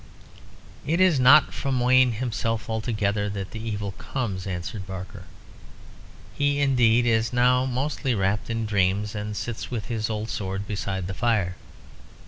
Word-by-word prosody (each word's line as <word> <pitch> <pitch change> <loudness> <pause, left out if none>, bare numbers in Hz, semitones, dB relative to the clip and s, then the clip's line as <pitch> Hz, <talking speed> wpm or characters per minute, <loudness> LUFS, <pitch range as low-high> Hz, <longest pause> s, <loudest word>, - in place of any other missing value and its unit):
"It 160 +5 0
is 185 -7 +4
not 135 +4 +6
from 135 -2 -1
Wayne 125 0 +4
himself 115 -1 -2
altogether 105 -2 -1
that 100 -1 -5
the 110 - -6
evil 105 -3 -3
comes," 100 -8 -4
answered 95 +2 -5
Barker. 95 0 -8 1.1
"He, 145 0 +1
indeed, 125 -4 +3
is 115 -1 +2
now 125 +1 +3
mostly 130 0 -1
wrapped 100 +2 0
in 115 -1 -1
dreams, 100 0 +1
and 105 0 -4
sits 120 -2 -5
with 115 -4 -5
his 110 -2 -2
old 110 0 -3
sword 95 0 -3
beside 100 -3 -3
the 95 - -4
fire. 105 -5 0
110 Hz, 145 wpm, -25 LUFS, 100-125 Hz, 1.1 s, not